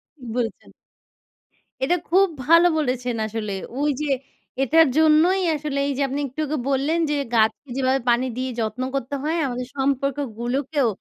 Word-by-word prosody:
ঠিক 260 - -14
বলেছেন। 230 -4 -3 1.1
এটা 350 +6 +3
খুব 385 +3 +5 0.2
ভালো 335 +2 +7
বলেছেন 250 -4 -1
আসলে 215 -1 -4 0.3
ওইযে 295 0 0 0.6
এইটার 315 +4 +5
জন্যই 320 +5 +4
আসলে 290 -1 -3
এইযে 280 0 -2
আপনি 275 +2 -3
একটু 265 +5 -11
আগে 300 +1 -2
বললেন 280 +5 +1
যে 295 - +1 0.2
গাছকে 225 +4 +1
যেভাবে 265 0 +2
পানি 240 +2 +3
দিয়ে 260 0 -2
যত্ন 220 +3 -2
করতে 275 +1 -2
হয় 320 +3 0
আমাদের 250 0 -4
সম্পর্কগুলোকেও 270 0 -1
275 Hz, 140 wpm, -23 LUFS, 250-305 Hz, 1.1 s, ভালো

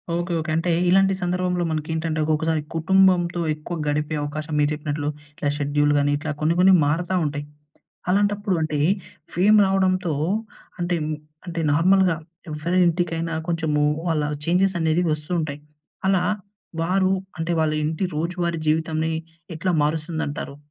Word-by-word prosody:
Okay. 175 +1 -2
Okay. 155 0 -4
అంటే 170 +1 0 0.2
ఇలాంటి 195 +1 +4
సందర్భంలో 180 0 0
మనకేంటంటే 160 +1 -2
ఒకొక్కసారి 155 0 +1
కుటుంబంతో 175 0 +3
ఎక్కువ 155 +3 -6
గడిపే 150 +1 0
అవకాశం 150 +1 -5
మీరు 145 - +3
జెప్పినట్లు, 150 -1 -3 0.2
ఇట్లా 145 -1 -2
షెడ్యూల్ 145 0 +1
గాని 145 0 +2
ఇట్లా 155 +1 -4
కొన్ని 160 +2 +2
కొన్ని 190 +1 +7
మారతా 175 +5 0
ఉంటాయి. 145 0 -3 0.7
అలాంటప్పుడు 205 0 +1
అంటే 155 -2 -1 0.6
ఫేమ్ 205 +5 +5
రావడంతో 185 -3 +1 0.7
అంటే, 175 0 0 0.5
అంటే 170 -1 -3
నార్మల్‌గా 180 +3 +4 0.3
ఎవరి 160 +4 -1
ఇంటికైనా 165 -1 0
కొంచెము 160 -3 0 0.3
వాళ్ళ 160 -2 +1 0.2
చేంజెస్ 185 +3 +2
అనేవి 160 +2 +2
వస్తూ 150 +1 -5
ఉంటాయి. 145 -2 -4 0.5
అలా 190 -2 +3 0.6
వారు, 190 +2 +2 0.3
అంటే 165 +2 -1
వాళ్ళింటి 155 +2 0
రోజువారి 170 +1 -1
జీవితాన్ని 160 0 0 0.4
ఎట్లా 185 +3 0
మారుస్తుందంటారు? 155 -2 -2
165 Hz, 125 wpm, -23 LUFS, 155-180 Hz, 0.7 s, కొన్ని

